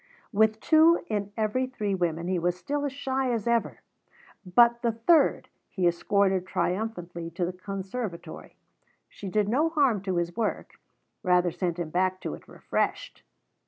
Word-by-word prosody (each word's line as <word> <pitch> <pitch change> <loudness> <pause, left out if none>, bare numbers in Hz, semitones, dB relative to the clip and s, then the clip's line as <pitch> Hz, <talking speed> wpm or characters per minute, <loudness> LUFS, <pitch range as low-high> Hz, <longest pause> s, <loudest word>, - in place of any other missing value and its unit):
With 220 0 +3
two 320 +2 +5
in 205 -1 -2
every 225 +4 0
three 210 -6 -3
women 170 -2 -1
he 185 -1 0
was 175 +1 0
still 290 +9 -2
as 285 - -2
shy 265 -1 -1
as 230 -4 -2
ever, 235 -1 0 0.6
but 235 +5 +4
the 235 -2 +1
third 230 +9 +3 0.2
he 185 -3 -2
escorted 190 +2 +1
triumphantly 175 -4 -3
to 170 +2 -2
the 180 - -4
conservatory. 195 +1 -6 0.5
She 200 - -8
did 210 +1 +1
no 285 +9 +2
harm 275 - +2
to 190 -2 -2
his 175 0 -1
work 225 -2 -2 0.5
rather 180 -2 +3
sent 175 0 -2
him 170 -3 -4
back 185 +1 +1
to - - -4
it - - -11
refreshed. - - -3
200 Hz, 160 wpm, -27 LUFS, 180-235 Hz, 0.6 s, two